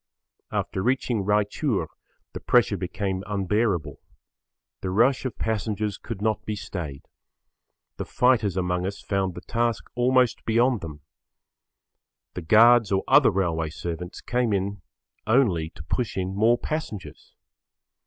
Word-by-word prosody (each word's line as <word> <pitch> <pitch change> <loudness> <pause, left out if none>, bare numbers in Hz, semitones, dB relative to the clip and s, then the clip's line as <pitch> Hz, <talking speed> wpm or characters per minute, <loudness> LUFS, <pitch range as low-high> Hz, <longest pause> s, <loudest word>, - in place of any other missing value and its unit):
After 95 - -2
reaching 120 -2 0
Raichur 105 - 0 0.5
the - - -5
pressure 120 -4 +3
became 95 +1 -3
[Pg 105 - -12 0.2
4]unbearable. 105 -5 0 0.8
The 95 - -3
rush 120 +8 +2
of 130 - -4
passengers 105 -2 -2
could 105 -4 -6
not 110 -1 0
be 105 - -3
stayed. 80 -8 -6 0.9
The - - -4
fighters 115 -7 +2
among 90 0 -1
us 100 +1 -5
found 95 -3 -2
the - - -7
task 115 0 -1
almost 125 0 +2
beyond 120 0 +2
them. 75 -3 -8 1.3
The 90 - -5
guards 110 +5 +5
or 95 0 +1
other - - +6
railway 85 -4 -1
servants 85 +2 -6
came 120 -3 0
in 100 0 -2 0.5
only 105 -10 +2
to 80 - -12
push 115 +8 -2
in 95 0 -2
more 115 +4 +4
passengers. 155 -9 -6
105 Hz, 135 wpm, -25 LUFS, 95-120 Hz, 1.3 s, other